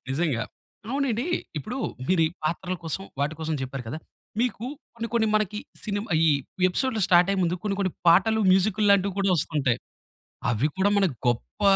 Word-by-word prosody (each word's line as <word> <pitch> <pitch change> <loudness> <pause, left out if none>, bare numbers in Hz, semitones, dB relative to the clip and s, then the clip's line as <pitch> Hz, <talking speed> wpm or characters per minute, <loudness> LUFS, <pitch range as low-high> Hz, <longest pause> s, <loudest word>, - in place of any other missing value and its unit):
నిజంగా. 135 -4 0 0.5
అవునండి. 270 -1 0 0.3
ఇప్పుడు 245 - -5 0.3
మీరీ 175 -3 +4 0.2
పాత్రల 180 +3 -1
కోసం 165 +4 -3 0.2
వాటి 150 +2 0
కోసం 160 0 -1
చెప్పారు 130 0 -5
కదా! 155 +6 -4 0.4
మీకు 245 -2 -1 0.3
కొన్ని, 230 0 -4
కొన్ని 225 -2 +2
మనకి 210 -1 +1 0.3
సినిమ 205 -1 -2 0.2
ఈ - - +5 0.4
ఎపిసోడ్‌లు 235 +4 0
స్టార్ట్ 175 +1 +5
అయ్యే 195 -1 +1
ముందు 175 +1 +1
కొన్ని, 200 -2 0
కొన్ని 185 -3 0 0.2
పాటలు 210 +6 +5
మ్యూజిక్కుల్లాంటివి 200 0 +3
కూడా 195 -1 +2
ఒస్తుంటాయి. 140 -6 0 0.7
అవి 120 +5 +2
కూడా 195 +2 +3
మనకు 190 -10 +2
గొప్ప 120 - -2
190 Hz, 155 wpm, -26 LUFS, 155-215 Hz, 0.7 s, ఈ